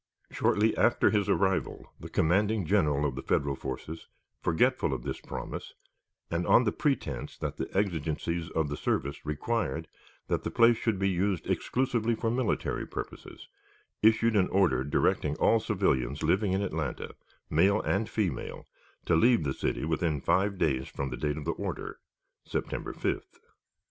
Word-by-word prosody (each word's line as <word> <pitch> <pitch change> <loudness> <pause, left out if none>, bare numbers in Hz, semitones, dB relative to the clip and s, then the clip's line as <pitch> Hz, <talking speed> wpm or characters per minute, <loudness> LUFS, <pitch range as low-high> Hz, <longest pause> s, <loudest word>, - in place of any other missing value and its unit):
Shortly 110 +2 +2
after 120 - +4
his 105 -2 +1
arrival, 95 -1 0
the - - -8
commanding 100 +4 +2
General 75 -6 +2
of 70 - 0
the 65 - -5
Federal 70 +1 0
forces, 75 +5 -6 0.3
forgetful 85 - +2
of - - -6
this - - -4
promise, - - -6 0.6
and 85 +1 -1
on 125 - +6
the 105 - +1
pretense 105 - -2
that - - -4
the - - -3
exigencies 85 -2 -1
of 80 -2 0
the 70 - -4
service 70 +1 -2
required 75 - -1 0.4
that - - 0
the - - -2
place 115 0 +5
should 110 -4 0
be 95 +1 +1
used 95 -1 0
exclusively 120 -3 0
for 115 0 -1
military 125 -1 -1
purposes, - - -8 0.5
issued 110 +1 +4
an 95 -3 +4
order 90 -9 +3
directing 75 +1 +1
all 115 - +4
civilians 70 - 0
living 95 +4 +2
in 95 +1 +1
Atlanta, 80 -6 -3 0.3
male 95 +7 +3
and 105 +3 0
female, 95 - -3 0.4
to - - +3
leave 115 +1 +4
the 70 -2 -1
city - - -2
within 80 -1 0
five 100 +7 +1
days 65 -7 0
from 70 -1 -4
the 65 - -4
date 75 0 -1
of 75 - -6
the - - +1
order - - -5 0.4
(September - - -3
5th). - - -3
90 Hz, 160 wpm, -29 LUFS, 75-105 Hz, 0.6 s, on